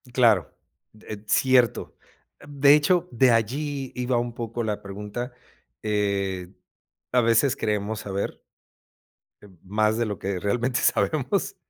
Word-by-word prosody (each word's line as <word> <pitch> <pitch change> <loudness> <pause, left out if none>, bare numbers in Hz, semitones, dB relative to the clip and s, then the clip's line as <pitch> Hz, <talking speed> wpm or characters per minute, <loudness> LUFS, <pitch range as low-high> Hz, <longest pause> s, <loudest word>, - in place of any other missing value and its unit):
Claro, 115 - +3 0.5
eh, 105 -1 -7
cierto. 125 -1 +2 0.5
De 140 0 +5
hecho, 165 +4 +3
de 125 +2 +4
allí 135 +4 -1
iba 125 0 0
un 120 0 -2
poco 115 0 -4
la 105 -2 -3
pregunta, 105 +5 -6 0.5
eh, 100 -3 -1 0.6
a 125 - +4
veces 115 +4 +3
creemos 105 -2 -2
saber 100 0 -4 1.0
em, 100 -3 -17
más 110 +3 +1
de 120 - +1
lo 105 -5 -4
que 95 -1 -3
realmente 120 +6 0
sabemos. - - 0
115 Hz, 125 wpm, -25 LUFS, 105-125 Hz, 1.0 s, De